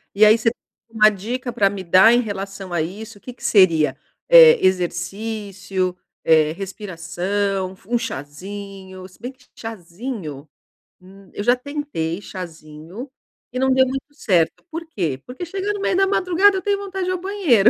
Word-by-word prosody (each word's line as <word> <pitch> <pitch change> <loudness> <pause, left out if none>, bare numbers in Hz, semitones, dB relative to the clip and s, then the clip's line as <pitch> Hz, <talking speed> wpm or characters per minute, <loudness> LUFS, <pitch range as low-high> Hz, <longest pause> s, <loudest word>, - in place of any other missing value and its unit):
E 215 - +7
aí 215 +2 +7
você 230 0 +1 0.4
uma 215 -1 +5
dica 240 +5 -4
para 200 -1 +3
me 195 -1 -6
dar 185 +6 +7
em 240 - +4
relação 195 -4 -5
a 170 - +1
isso? 210 +6 -6
O - - -21
que 250 - -9
que - - -18
seria, 165 -7 +4 0.3
eh, - - +9
exercício, 190 +1 -2 0.3
eh, 155 -1 +4
respiração, 190 +1 -3
f 195 - -25
um 240 - +1
cházinho, 190 - -7
se 185 - -20
bem 250 +2 -5
q 260 - -28
que - - -18
cházinho 180 - -7 0.5
hum, 195 +1 -16
eu 205 - -4
já 245 +2 +4
tentei 250 - -4
cházinho, 170 - -9 0.4
e 255 - -3
não 265 - +2
deu 260 0 +5
muito 270 +2 -5
certo. 175 -6 +1
Por 330 +1 -6
quê? 155 - -2
Porque 255 +8 -7
chega 390 +4 -2
no 405 - -5
meio 380 - +1
da 390 0 +4
madrugada, 380 +1 +3
eu - - -3
tenho 405 +1 +1
vontade 385 -1 -4
de 365 - -1
ir - - +1
ao 365 - -3
banheiro. 340 - +4
205 Hz, 180 wpm, -21 LUFS, 185-255 Hz, 0.5 s, eh